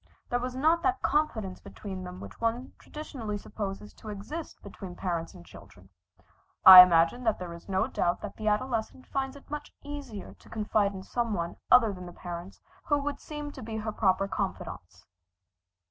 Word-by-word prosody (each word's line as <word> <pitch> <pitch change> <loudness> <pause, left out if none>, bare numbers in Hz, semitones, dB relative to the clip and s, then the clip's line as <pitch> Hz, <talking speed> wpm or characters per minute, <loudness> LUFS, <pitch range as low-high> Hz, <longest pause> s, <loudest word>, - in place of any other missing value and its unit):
There 245 - +2
was 250 +1 -4
not 320 +5 +3
that 380 +2 0
confidence 225 -11 0
between 190 -3 -8
them 180 0 -8
which - - -11
one 230 +3 -1
traditionally 250 -9 -6
supposes 205 0 -6
to 215 - -11
exist 215 +11 -6
between 190 -2 -9
parents 170 -3 -3
and 85 - -13
children. 95 +1 -15 0.8
I 185 -1 +15
imagine 175 +7 +4
that 220 - +2
there 175 -2 -6
is 170 +3 -12
no 190 +2 +2
doubt 175 -8 0
that 210 - -6
the 215 - -4
adolescent 230 +3 -1
finds 270 0 -3
it 280 - -15
much 295 0 -5
easier 285 -8 -7
to - - -20
confide 210 -2 +1
in 190 - -7
some 235 0 -1
one 170 -1 -3
other 230 -4 +6
than 180 -1 -8
the 175 - -10
parents 175 +2 -8 0.3
who 290 - +2
would 285 0 -3
seem 295 -1 -6
to 265 - -10
be 220 -1 -5
her 215 0 -3
proper 195 -2 +2
confidants. - - -5
215 Hz, 180 wpm, -29 LUFS, 190-260 Hz, 0.8 s, I